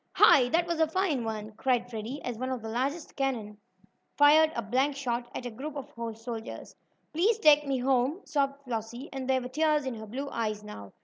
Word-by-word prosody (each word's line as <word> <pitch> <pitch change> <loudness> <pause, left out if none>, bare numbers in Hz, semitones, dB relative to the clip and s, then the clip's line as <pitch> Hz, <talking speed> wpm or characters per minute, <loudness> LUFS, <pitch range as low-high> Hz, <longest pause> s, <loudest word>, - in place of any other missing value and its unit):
"Hi! 250 -3 +6
That 335 +4 +2
was 340 -2 -2
a 320 - +4
fine 320 -6 0
one!" 215 -1 -4
cried 245 +2 0
Freddie, 235 +4 -6
as 245 - -3
one 255 +1 -2
of 255 -3 -3
the 220 - -5
largest 275 +8 -2
cannon 225 -7 -2 0.6
fired 310 +2 +6
a 235 - -2
blank 260 +7 +1
shot 240 -3 -2
at 250 - -5
a 245 - -4
group 280 +7 -7
of 285 0 -7
horse 230 -3 -7
soldiers. 230 -2 -6 0.4
"Please 400 +8 +3
take 300 -8 +5
me 270 -1 +1
home!" 265 +6 +1
sobbed 280 -2 -1
Flossie, 235 +2 -5
and 265 -1 -5
there 260 -1 +3
were 250 - -5
tears 300 +2 +1
in 260 - -2
her 220 -1 -8
blue 265 +6 -4
eyes 215 -2 -2
now. 100 - -10
260 Hz, 210 wpm, -29 LUFS, 230-290 Hz, 0.6 s, Hi